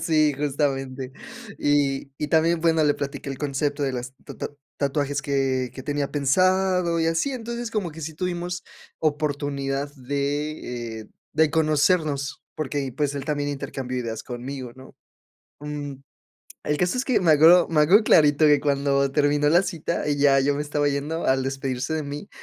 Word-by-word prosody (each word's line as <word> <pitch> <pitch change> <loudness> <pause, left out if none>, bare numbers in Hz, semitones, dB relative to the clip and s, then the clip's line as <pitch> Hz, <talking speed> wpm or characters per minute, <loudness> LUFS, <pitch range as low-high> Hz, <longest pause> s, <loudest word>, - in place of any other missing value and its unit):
Sí, 155 -2 +3
justamente, 135 -2 -2 0.5
y 140 -1 +1
y 150 - -2
también, 165 +1 +3
bueno, 160 -1 +3
le 145 -1 +3
platiqué 140 0 -5
el 135 - -6
concepto 145 0 -1
de 135 - 0
las 125 +1 -5
ta - - -10
ta - - -4 0.3
tatuajes 140 0 -1
que 135 -3 0
que 130 - -7
tenía 145 0 -2
pensado 180 +3 +2
y 160 - +1
así, 165 +12 0
entonces, 235 -1 -5
como 205 -7 -2
que 160 +2 -10
sí 160 0 -5
tuvimos 175 0 -3 0.4
oportunidad 145 -2 -1
de, 140 -4 -3
eh, 110 - -11 0.3
de 155 0 +4
conocernos 155 -2 +1
porque, 140 -3 -3
pues, 145 -1 0
él 140 - -4
también 145 -1 -1
intercambió 130 -2 -4
ideas 115 -2 -4
conmigo, 125 0 -6
¿no?, 130 0 -14 0.7
mm, 145 -1 -5 0.7
el 150 - 0
caso 180 +9 0
es 255 - 0
que 255 - +2
me 175 -3 +3
acuerdo 165 +4 +7
me 160 -2 +2
acuerdo 185 +9 +6
clarito 150 -3 +5
que 150 -1 +5
cuando 140 -1 +1
terminó 145 0 +2
la 170 +4 +5
cita 170 -3 -3
y 145 - +1
ya 140 -1 +5
yo 140 +1 +2
me - - -3
estaba 145 0 0
yendo, 145 +4 -2
al 130 0 +2
despedirse 135 +1 -2
de 155 - -1
mí 145 +6 -6
145 Hz, 170 wpm, -24 LUFS, 135-160 Hz, 0.7 s, acuerdo